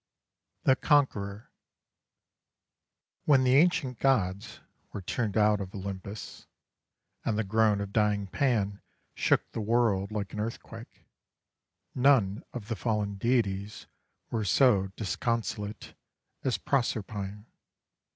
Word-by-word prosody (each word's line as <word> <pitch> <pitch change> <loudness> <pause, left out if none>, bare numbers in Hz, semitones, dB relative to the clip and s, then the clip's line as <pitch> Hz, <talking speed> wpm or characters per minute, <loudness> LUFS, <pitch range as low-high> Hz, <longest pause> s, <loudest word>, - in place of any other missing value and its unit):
THE 130 - +5
CONQUEROR 110 -9 +1 1.7
When 140 -3 +5
the 125 0 +3
ancient 150 -5 +3
gods 105 -5 0 0.3
were 100 - -6
turned 105 +2 -2
out 105 -1 +4
of 95 +1 -7
Olympus, 100 +1 -7 0.8
and 110 -2 0
the 110 - +1
groan 110 0 +2
of 100 0 -5
dying 105 -2 +2
Pan 100 -2 0 0.3
shook - - +1
the 115 - -4
world 110 -3 +1
like 100 -2 -4
an 105 - -5
earthquake, 110 -3 -7 0.9
none 125 -7 +3
of 115 -4 -7
the 115 - -2
fallen 105 -2 -1
deities 105 -2 -1 0.5
was 110 -4 -1
so 105 -5 +4
disconsolate 110 0 -3 0.5
as 130 - +1
Proserpine. 105 -5 -2
105 Hz, 110 wpm, -29 LUFS, 100-120 Hz, 1.7 s, THE